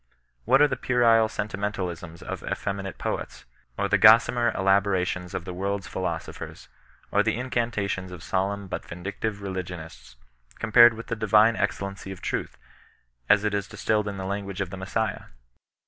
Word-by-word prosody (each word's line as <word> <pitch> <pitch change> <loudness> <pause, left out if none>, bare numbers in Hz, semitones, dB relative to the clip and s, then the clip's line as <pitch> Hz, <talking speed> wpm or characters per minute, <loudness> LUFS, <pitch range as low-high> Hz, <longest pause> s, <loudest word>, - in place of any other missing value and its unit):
What 135 +5 +5
are - - +6
the 130 - -2
puerile 115 -3 +3
sentimental 105 -2 -3
isms 85 -1 -10
of - - -5
effeminate 100 -1 -4
poets, - - -4 0.3
or - - 0
the - - +2
gossamer 115 +2 +6
elaborations 95 -2 +1
of 85 - -4
the 90 - -5
world's 100 +1 -2
philosophers, - - -5 0.4
or - - +4
the - - +1
incantations 115 -7 -2
of 90 -2 -9
solemn 100 +1 -1
but 90 - -4
vindictive 100 +4 -5
religionists, 85 -10 -7 0.4
compared 115 +1 +6
with 115 - -8
the 115 - -3
divine 110 +1 +4
excellency 100 -2 -3
of 95 - -8
Truth, - - -3 0.7
as 100 0 +5
it 105 - +1
distilled 105 +1 -1
in 100 -1 -4
the 95 - -5
language 100 0 -4
of 95 -2 -3
the - - -5
Messiah 100 +3 -2
100 Hz, 155 wpm, -26 LUFS, 95-110 Hz, 0.7 s, are